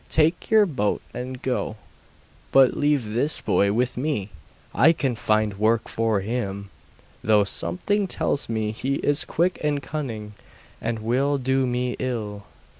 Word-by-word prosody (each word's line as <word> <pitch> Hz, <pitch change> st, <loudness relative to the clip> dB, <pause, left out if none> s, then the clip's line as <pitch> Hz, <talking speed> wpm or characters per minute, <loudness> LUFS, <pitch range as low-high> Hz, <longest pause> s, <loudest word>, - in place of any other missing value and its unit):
Take 160 Hz, +2 st, +1 dB
your 220 Hz, -1 st, +6 dB
boat 115 Hz, -, -1 dB
and 130 Hz, +1 st, -5 dB
go; 125 Hz, -4 st, -2 dB, 0.8 s
but 135 Hz, -2 st, +5 dB
leave 145 Hz, -7 st, +1 dB
this 140 Hz, +7 st, +3 dB
boy 100 Hz, 0 st, +2 dB
with 125 Hz, +4 st, 0 dB
me 125 Hz, -8 st, -2 dB, 0.4 s
I 160 Hz, +6 st, +5 dB
can 135 Hz, -6 st, -1 dB
find 110 Hz, -2 st, 0 dB
work 110 Hz, +1 st, +2 dB
for 110 Hz, -3 st, 0 dB
him, 100 Hz, -2 st, -4 dB, 0.5 s
though 105 Hz, -1 st, +4 dB
something 200 Hz, -, 0 dB
tells 145 Hz, -6 st, -1 dB
me 110 Hz, -2 st, -1 dB
he 130 Hz, +5 st, -2 dB
is 145 Hz, +1 st, +1 dB
quick 175 Hz, +2 st, 0 dB
and 150 Hz, -1 st, +1 dB
cunning, 120 Hz, -8 st, -5 dB, 0.5 s
and 115 Hz, 0 st, -2 dB
will 135 Hz, +5 st, +1 dB
do 130 Hz, 0 st, +1 dB
me 125 Hz, 0 st, -1 dB
ill. 105 Hz, -5 st, -4 dB
125 Hz, 145 wpm, -24 LUFS, 110-145 Hz, 0.8 s, your